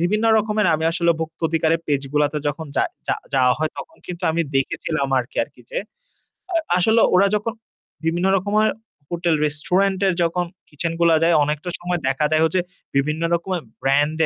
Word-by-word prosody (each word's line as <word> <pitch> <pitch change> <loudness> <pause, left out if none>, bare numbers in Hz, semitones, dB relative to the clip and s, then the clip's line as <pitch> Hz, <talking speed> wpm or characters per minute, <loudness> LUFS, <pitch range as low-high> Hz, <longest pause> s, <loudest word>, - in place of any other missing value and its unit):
বিভিন্ন 210 +6 +1
রকমের 210 -2 +1
আমি 160 +1 -1
আসলে 170 0 +2
ভুক্ত 160 0 -5
অধিকারের 165 0 +1
পেজগুলাতে 145 +1 0
যখন 155 +2 -4
যায় - - +2 0.4
যাওয়া 125 -1 +4
হয় 155 0 0
তখন 325 - -9
কিন্তু 180 0 -7
আমি 165 +1 +1
দেখেছিলাম 140 +2 -1
আরকি, 125 +1 -5
আরকি - - -20
যে। - - -2 0.8
আ - - 0 0.2
আসলে 220 +5 +4
ওরা 195 +2 +5
যখন 215 +2 -2 0.5
বিভিন্ন 175 +3 +1
রকমের 210 +3 +2 0.4
হোটেল-রেস্টুরেন্টে 175 +4 +1
এর 180 - 0
যখন 175 +1 0 0.2
কিচেন 165 +3 -3
গুলা 170 -1 +5
যায় 170 0 +4
অনেকটা 150 +4 -2
সময় 175 0 -2
দেখা 150 +3 +1
যায় 155 0 +3
যে 185 - +4 0.3
বিভিন্ন 150 +3 +1
রকমের 175 +1 -1 0.2
ব্র্যান্ড 145 +3 +2
165 Hz, 160 wpm, -21 LUFS, 150-185 Hz, 0.8 s, ওরা